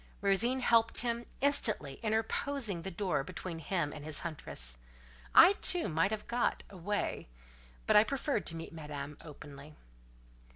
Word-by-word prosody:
Rosine 230 Hz, +6 st, +2 dB
helped 230 Hz, -2 st, +3 dB
him, 235 Hz, 0 st, -2 dB
instantly 220 Hz, -, +2 dB
interposing 220 Hz, -1 st, -1 dB
the 190 Hz, -, -4 dB
door 175 Hz, -6 st, -1 dB
between 175 Hz, +1 st, -6 dB
him 165 Hz, -2 st, -1 dB
and 150 Hz, -, -9 dB
his 155 Hz, -1 st, -2 dB
huntress. 60 Hz, -, -4 dB, 0.6 s
I, 360 Hz, +4 st, +9 dB
too, 355 Hz, -2 st, +2 dB
might 165 Hz, +3 st, +2 dB
have 215 Hz, 0 st, -4 dB
got, 240 Hz, 0 st, -1 dB
away, 200 Hz, -, -3 dB, 0.6 s
but -, -, +3 dB
I 210 Hz, -, +9 dB
preferred 275 Hz, +4 st, -2 dB
to 165 Hz, -, -3 dB
meet 165 Hz, 0 st, -7 dB
Madame 150 Hz, -2 st, -7 dB
openly. 150 Hz, -1 st, -11 dB
190 Hz, 140 wpm, -32 LUFS, 150-230 Hz, 0.6 s, I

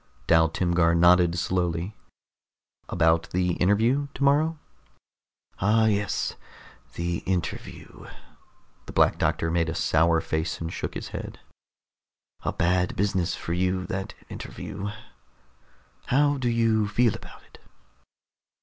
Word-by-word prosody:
Dal 80 Hz, -1 st, +4 dB
Timgar 85 Hz, -1 st, +2 dB
nodded 85 Hz, 0 st, +5 dB
slowly. 90 Hz, +2 st, -1 dB, 0.9 s
"About 80 Hz, -1 st, +2 dB
the 90 Hz, 0 st, 0 dB
interview 115 Hz, +9 st, +2 dB
tomorrow?" 145 Hz, +4 st, +2 dB, 1.0 s
"Ah, 110 Hz, +3 st, +3 dB
yes. 105 Hz, -2 st, 0 dB, 0.6 s
The 85 Hz, 0 st, -2 dB
interview." 90 Hz, -2 st, -4 dB, 0.8 s
The -, -, -8 dB
Black -, -, +3 dB
Doctor 80 Hz, -, 0 dB
made 85 Hz, -1 st, +1 dB
a 80 Hz, -, -3 dB
sour 80 Hz, +1 st, +3 dB
face 80 Hz, +1 st, -2 dB
and 80 Hz, 0 st, -5 dB
shook -, -, -5 dB
his -, -, -5 dB
head. -, -, -7 dB, 1.0 s
"A -, -, 0 dB
bad 90 Hz, +1 st, +1 dB
business 95 Hz, -3 st, 0 dB
for 85 Hz, -, -4 dB
you, 90 Hz, +1 st, 0 dB
that 95 Hz, -2 st, -5 dB
interview. 100 Hz, +1 st, -6 dB, 1.2 s
How 145 Hz, +2 st, +2 dB
do 125 Hz, -2 st, 0 dB
you 115 Hz, -2 st, +2 dB
feel 115 Hz, +1 st, +2 dB
about -, -, -11 dB
it?" -, -, -19 dB
90 Hz, 115 wpm, -26 LUFS, 85-110 Hz, 1.2 s, nodded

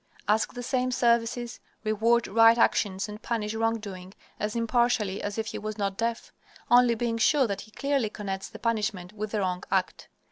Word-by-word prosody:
Ask 215 Hz, +4 st, +1 dB
the 245 Hz, -, -5 dB
same 255 Hz, 0 st, 0 dB
services, 235 Hz, 0 st, +1 dB, 0.2 s
reward 230 Hz, +2 st, +2 dB
right 225 Hz, +2 st, +6 dB
actions 200 Hz, -3 st, +2 dB
and 210 Hz, +1 st, -9 dB
punish 220 Hz, -2 st, -2 dB
wrongdoing 210 Hz, -4 st, -3 dB, 0.2 s
as 210 Hz, +1 st, -2 dB
impartially 230 Hz, -4 st, +1 dB
as 205 Hz, +1 st, -4 dB
if 220 Hz, -, -1 dB
he -, -, -5 dB
was 215 Hz, 0 st, -5 dB
not 200 Hz, -2 st, -1 dB
deaf, 230 Hz, +2 st, -3 dB, 0.4 s
only 245 Hz, -1 st, +6 dB
being 230 Hz, 0 st, -1 dB
sure 270 Hz, +5 st, +4 dB
that 200 Hz, -3 st, -3 dB
he 215 Hz, -, -13 dB
clearly 275 Hz, 0 st, -1 dB
connects 195 Hz, -2 st, -5 dB
the -, -, -10 dB
punishment 210 Hz, -5 st, -2 dB
with 215 Hz, 0 st, -4 dB
the 210 Hz, 0 st, -1 dB
wrong 180 Hz, -1 st, -2 dB
act. 190 Hz, -1 st, -1 dB
220 Hz, 180 wpm, -27 LUFS, 205-235 Hz, 0.4 s, right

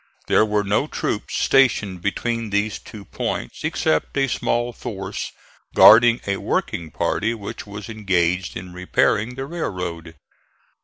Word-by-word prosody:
There -, -, +4 dB
were 105 Hz, -1 st, +1 dB
no 100 Hz, +1 st, +1 dB
troops -, -, -3 dB
stationed 110 Hz, -9 st, +2 dB
between 115 Hz, +3 st, -2 dB
these 105 Hz, +1 st, 0 dB
two 105 Hz, -2 st, -11 dB
points, -, -, -4 dB
except 80 Hz, -, 0 dB
a 135 Hz, 0 st, +3 dB
small 120 Hz, -1 st, -1 dB
force 95 Hz, -3 st, -5 dB, 0.4 s
guarding 115 Hz, +2 st, +8 dB
a 100 Hz, -1 st, -1 dB
working 85 Hz, -2 st, -2 dB
party 115 Hz, +8 st, -1 dB
which 105 Hz, -1 st, -8 dB
was 105 Hz, -1 st, -8 dB
engaged 95 Hz, -4 st, 0 dB
in 90 Hz, 0 st, -9 dB
repairing 100 Hz, +5 st, +1 dB
the 135 Hz, +1 st, -4 dB
railroad. 90 Hz, -, -5 dB
105 Hz, 135 wpm, -22 LUFS, 90-115 Hz, 0.4 s, guarding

